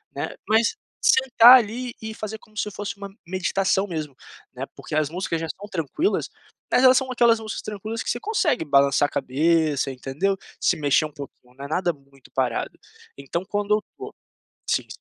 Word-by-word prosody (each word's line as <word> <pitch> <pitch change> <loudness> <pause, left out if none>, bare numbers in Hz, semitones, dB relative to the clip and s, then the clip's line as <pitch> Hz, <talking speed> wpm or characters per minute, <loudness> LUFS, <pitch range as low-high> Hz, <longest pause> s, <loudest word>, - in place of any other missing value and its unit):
né. - - -4 0.2
Mas, 225 - +3 0.3
sentar 255 -1 +7
ali, 240 +3 -4
e 220 0 -6
fazer 215 +1 -6
como 215 0 -21
se 210 -1 -2
fosse 205 0 -6
uma 200 0 -8 0.2
meditação 190 +1 0
mesmo, 155 -6 -5 0.4
né, - - -4
porque - - -6
as 155 -1 +2
músicas 170 -1 -3
já 165 - -3
são 205 +5 -8
tranquilas, 185 - -1 0.4
mas 250 - +4
elas 260 0 +7
são 260 -1 -1
aquelas 235 -2 +4
músicas 220 0 -5
tranquilas 215 +2 -5
que - - -4
você 240 - -1
consegue 315 - 0
balançar 140 0 +4
a - - -12
cabeça, 150 +1 +1
entendeu. 135 +9 -1 0.2
Se - - +2
mexer 145 0 +2
um 155 - -7
pouquinho, 135 -3 -12
não 140 +1 -8
é - - -5
nada 175 +3 0
muito 140 -1 -22
parado. 130 -3 -2 0.4
Então 140 +6 -4
quando 205 +1 0
eu 210 - -2
tô - - -8 0.6
sim. - - +1
190 Hz, 185 wpm, -24 LUFS, 145-220 Hz, 0.6 s, sentar